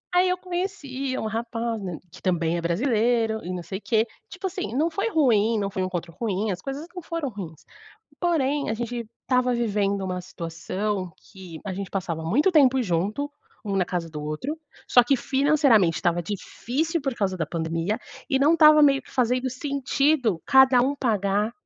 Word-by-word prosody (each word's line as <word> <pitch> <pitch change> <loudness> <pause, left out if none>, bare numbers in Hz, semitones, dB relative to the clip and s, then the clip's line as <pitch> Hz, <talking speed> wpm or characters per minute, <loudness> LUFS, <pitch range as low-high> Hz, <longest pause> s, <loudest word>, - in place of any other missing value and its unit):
Aí 365 +1 +4
eu 365 - +1
conheci 350 -8 -3
um - - -3
rapaz, 230 +1 -3
né, 180 -5 -5
que - - -13
também 170 -3 +1
é - - -1
brasileiro 225 +4 +1
e 180 - -4
não 180 -1 -4
sei 190 +3 -6
quê, 220 0 +1 0.2
tipo 380 +1 -6
assim, 225 - -5
não 320 +4 +2
foi 395 +7 -1
ruim, 230 - +3
não 200 -1 -1
foi 190 - -2
um - - 0
encontro 175 -2 -5
ruim, 215 -2 -1
as 185 -1 -3
coisas 275 +4 -5
não 360 - -6
foram 330 -3 -3
ruins. 180 -8 -9 0.6
Porém, 295 -6 +1
a - - 0
gente 235 0 -4 0.2
estava 250 -1 +2
vivendo 205 -4 0
uma 180 -1 -3
situação 185 +2 -4 0.2
que 180 -4 -10
a 195 - -3
gente 195 -1 -5
passava 175 -4 -3
muito 260 - +3
tempo 265 -5 +5
junto, 205 +9 -1 0.3
um 200 -2 -2
na 185 - +3
casa 175 -2 -3
do 150 -1 -6
outro, 155 - -4 0.3
só 245 - +7
que 275 +3 +3
financeiramente 265 - +3
estava 175 -1 +1
difícil, 260 - -2
por 270 -2 -1
causa 195 -4 -1
da 165 -3 -2
pandemia, 165 +5 -2 0.3
e 270 - +2
não 295 +4 +4
estava 305 -2 +7
meio 275 -2 +5
que - - -18
fazendo 250 0 +1
sentido 275 - 0
cada 265 -1 +6
um 275 +3 +1
pagar 210 -3 0
230 Hz, 185 wpm, -25 LUFS, 190-275 Hz, 0.6 s, só